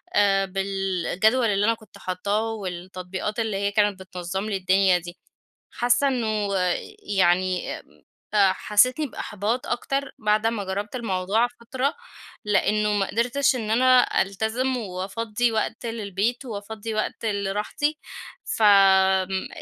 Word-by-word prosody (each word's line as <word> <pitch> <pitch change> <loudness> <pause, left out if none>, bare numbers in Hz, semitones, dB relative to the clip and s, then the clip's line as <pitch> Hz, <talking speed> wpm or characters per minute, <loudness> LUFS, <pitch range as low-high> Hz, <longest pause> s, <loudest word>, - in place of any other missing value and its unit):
آآ، 195 -1 +4
بالجدول 195 +4 0
اللي 205 -1 +1
أنا 230 - +3
كنت 215 -3 -15
حاطاه 205 +5 -2
والتطبيقات 185 +1 -5
اللي 220 -3 -1
هي 200 +1 0
كانت 205 -2 +1
بتنظم 185 +1 -5
لي 210 -2 -1
الدنيا 190 0 +3
دي. 175 +1 -9 0.5
حاسّة 245 +3 +2
إنّه 215 -6 -1 0.6
يعني 185 0 +2 0.6
آآ، 200 -3 +5
حسيتني 250 +10 +2
بإحباط 220 +1 -3
أكتر 275 +3 -2
بعد 215 0 +2
ما 225 -3 -1
جرّبت 200 +4 -4
الموضوع 215 0 0
فترة، 260 +4 -2 0.5
لأنّه 210 +1 +2
ما 200 -2 +1
قدرتش 250 +6 +1
إن 220 -3 -3
أنا 255 +2 +4
ألتزم 220 +7 -1
وأفضي 210 +3 -2
وقت 220 +2 -2
للبيت، 225 +2 -2
وأفضي 220 0 -6
وقت 215 +1 -3
لراحتي 210 +9 -1 0.6
ف - - -5
آمم، 190 -2 +4
210 Hz, 120 wpm, -24 LUFS, 190-230 Hz, 0.6 s, آآ